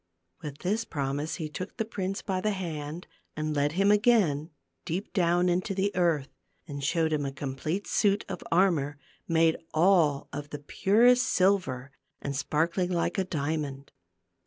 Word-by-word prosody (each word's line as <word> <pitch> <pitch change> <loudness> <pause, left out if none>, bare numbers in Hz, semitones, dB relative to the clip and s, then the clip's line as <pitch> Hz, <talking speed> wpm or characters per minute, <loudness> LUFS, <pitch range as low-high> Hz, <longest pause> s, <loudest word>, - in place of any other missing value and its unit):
With 145 -2 -6
this 215 +5 +1
promise 145 -2 -3
he 160 -4 -4
took 180 +6 -7
the 225 - -1
prince 195 -3 -4
by 190 -2 -1
the 215 - +1
hand 165 -3 -5 0.3
and 155 0 -2
led 145 +1 +1
him 195 +3 +3
again 205 -9 +3 0.3
deep 185 +6 -4
down 175 -1 +3
into 185 +3 0
the 200 +1 0
earth, 165 -6 +1 0.4
and 140 -2 -6
showed 160 +2 +1
him 150 -1 0
a 135 - -2
complete 140 +7 -3
suit 205 0 +2
of - - -5
armor 165 -6 +2 0.3
made 165 -1 +3 0.2
all 160 -4 +3
of 145 0 -5
the 145 - -5
purest 235 +11 +3
silver, 180 -9 +1 0.3
and 140 0 -4
sparkling 165 +6 0
like 175 +2 0
a - - +2
dia 155 -3 -2
mond. 140 -2 -6
165 Hz, 160 wpm, -28 LUFS, 145-190 Hz, 0.4 s, him